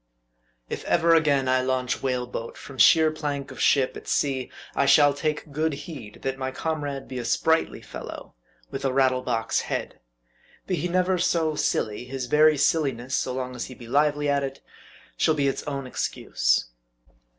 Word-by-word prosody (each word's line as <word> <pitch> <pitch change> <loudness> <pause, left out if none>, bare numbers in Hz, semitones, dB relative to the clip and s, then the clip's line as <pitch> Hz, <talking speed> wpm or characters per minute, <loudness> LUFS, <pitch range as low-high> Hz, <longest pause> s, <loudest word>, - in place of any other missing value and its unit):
IF - - -5
ever 170 0 +3
again 145 -5 +3
I 130 0 +3
launch 130 -1 -1
whale 125 -2 -1
boat 115 -1 -6
from 135 -2 -11
sheer 160 -1 +6
plank 145 -3 -4
of - - -7
ship 135 -3 +3
at - - -10
sea, 135 -3 0 0.2
I 140 - +1
shall 145 -1 +6
take 150 +1 -3
good 155 +2 0
heed, 130 - -10
that 135 0 -2
my 130 0 -2
comrade 145 -1 -3
be 130 - -5
a - - -4
sprightly 160 +7 +1
fellow, - - -9 0.4
with 135 - -5
a 135 - +1
rattle 130 -1 +2
box 115 -3 0
head. - - -4 0.7
Be 190 - -3
he 175 - -1
never 185 +1 +1
so 165 -2 +1
silly, 110 -6 -1
his 130 0 -4
very 150 +3 +5
silliness, 135 -4 +1
so 130 - -1
long 125 0 -4
as 120 - -4
he 130 - -10
be 120 - -12
lively 145 +3 +2
at 140 -1 +2
it, 135 0 -5 0.6
shall 160 - +3
be 140 -2 +1
its 135 - -1
own 140 -2 -3
excuse. - - 0
140 Hz, 180 wpm, -25 LUFS, 130-155 Hz, 0.7 s, sheer